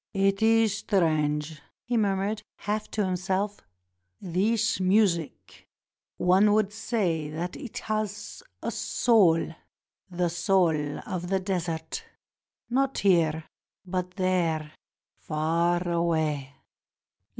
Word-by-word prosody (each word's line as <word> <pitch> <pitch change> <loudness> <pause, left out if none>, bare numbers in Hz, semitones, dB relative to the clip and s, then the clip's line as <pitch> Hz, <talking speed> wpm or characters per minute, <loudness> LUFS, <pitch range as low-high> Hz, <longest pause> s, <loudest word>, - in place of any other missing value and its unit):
"It 195 +1 +2
is 225 -2 +4
strange," 155 -6 0 0.2
he 245 - -2
murmured 205 0 0
half 210 +1 -3
to 210 -2 -1
himself, 190 +2 -1 0.6
"this 210 +5 +1
music; 185 -4 0 0.5
one 195 +4 +4
would 210 -1 +2
say 185 -9 -1
that 170 +4 -4
it 260 -7 -8
has 215 - -3 0.2
a - - -1
soul 195 -9 +3 0.3
— - - -68 0.2
the 175 -1 0
soul 165 -4 +1
of 175 -1 -4
the 190 +1 +1
desert; 180 - -3 0.6
not 270 +2 0
here, 165 -5 +3 0.4
but 180 0 -3
there, 170 -5 0 0.5
far 170 +3 0
away. 160 -5 0
185 Hz, 105 wpm, -27 LUFS, 165-210 Hz, 0.6 s, is